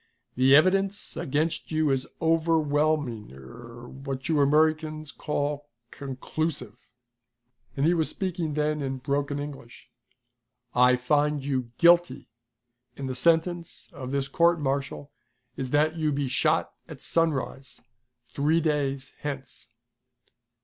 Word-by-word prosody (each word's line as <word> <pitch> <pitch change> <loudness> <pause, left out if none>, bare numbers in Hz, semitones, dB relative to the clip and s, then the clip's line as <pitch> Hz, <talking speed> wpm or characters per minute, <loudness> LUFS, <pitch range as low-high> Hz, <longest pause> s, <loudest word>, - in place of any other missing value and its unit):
"The 130 +2 +6
evidence 195 +5 +2
against 155 +5 -2
you 155 -2 +2
is 135 -1 0
over 165 0 +2
whelming 145 -7 0
er 115 - -12
what 135 0 -6
you 155 -3 +2
Americans 155 +1 +1
call 145 -1 -3 0.2
conclusive," 135 -2 -4 1.0
and 140 - +2
he 170 - +4
was 160 -3 +1
speaking 175 -5 -3
then 150 0 0
in 135 -1 -3
broken 140 +2 -2
English. 145 -4 -9 0.8
"I 125 0 +5
find 145 +3 +1
you 130 -4 -1
guilty, 175 -6 +4 0.7
and 135 - -4
the 130 - -3
sentence 170 +5 0
of 130 -2 -7
this 140 0 -1
court 170 +4 +3
martial 140 0 -3 0.4
is 130 -1 -4
that 155 +4 +2
you 155 -2 +1
be 140 -1 -1
shot 155 +5 +1
at 150 -5 -8
sunrise, 140 -5 -1 0.5
three 155 +4 +1
days 140 -4 -1
hence!" 135 -6 -7
145 Hz, 120 wpm, -26 LUFS, 135-160 Hz, 1.0 s, The